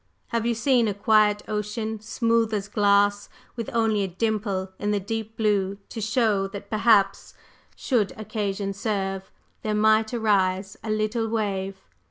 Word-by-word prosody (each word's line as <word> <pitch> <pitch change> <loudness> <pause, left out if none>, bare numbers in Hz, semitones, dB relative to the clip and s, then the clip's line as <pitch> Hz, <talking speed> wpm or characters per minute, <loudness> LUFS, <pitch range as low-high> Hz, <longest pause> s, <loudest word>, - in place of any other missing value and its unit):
Have 230 0 -1
you 235 - +1
seen 240 0 +3
a 205 - -1
quiet 210 0 +3
ocean, 215 +1 -3
smooth 230 0 +1
as 200 -1 -3
glass, 205 -1 +2 0.3
with 230 -2 -4
only 225 -3 +1
a 195 - 0
dimple 195 -1 -2
in 205 - -1
the 205 -1 +1
deep 220 +2 -5
blue 200 -3 +1
to 225 - -6
show 215 -3 +1
that 200 +3 -9
perhaps, 215 -2 +2 0.4
should 230 -7 0
occasion 200 -2 -3
serve, 195 -2 -3 0.3
there 215 -1 -1
might 220 +1 +3
arise 195 -4 +1
a 220 - -5
little 215 +2 0
wave? 195 -3 -2
210 Hz, 150 wpm, -25 LUFS, 200-220 Hz, 0.4 s, seen